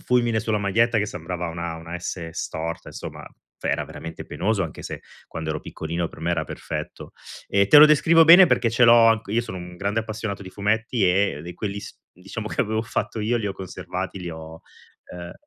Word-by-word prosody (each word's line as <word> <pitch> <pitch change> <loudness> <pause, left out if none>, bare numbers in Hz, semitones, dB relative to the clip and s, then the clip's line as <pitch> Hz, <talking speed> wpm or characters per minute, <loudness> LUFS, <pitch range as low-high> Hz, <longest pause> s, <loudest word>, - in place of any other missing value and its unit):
un - - -18
fulmine 120 -3 +2
sulla 110 0 -1
maglietta 110 +3 +2
che 105 - 0
sembrava 90 -2 -5
una, 85 0 -5
una 85 +1 -8
"S" 85 -1 -5
storta; 80 +3 -5
insomma, - - -8 0.4
era - - -1
veramente 80 0 -9
penoso, 100 -2 -1
anche 75 - -8
se - - -6 0.3
quando 80 -1 -5
ero 75 -1 -3
piccolino 85 +1 -4
per 80 - -14
me 85 - -1
era 80 -2 -1
perfetto. 75 0 -7 0.3
E 100 0 +2
te 150 - +9
lo 150 - +11
descrivo 160 +2 +5
bene 175 +3 +9
perché 115 - +2
ce 120 +2 +4
l'ho 115 -1 +7
anc 115 -3 +1
io 115 +3 +1
sono 95 -5 -7
un 90 0 -9
grande 100 +4 -1
appassionato 110 -2 -5
di 95 - -10
fumetti 110 +2 0
e 95 -5 +1
di 85 0 -8
quelli 100 0 -4
s - - -10 0.2
diciamo 100 +4 -7
che - - -2
avevo 110 +1 0
fatto 110 -1 -3
io, 115 +3 +1
li 105 - -3
ho 100 - -2
conservati, 95 0 -6
li 90 - -5
ho, 80 0 -9 0.5
ehm 90 0 -8
100 Hz, 210 wpm, -23 LUFS, 85-110 Hz, 0.5 s, lo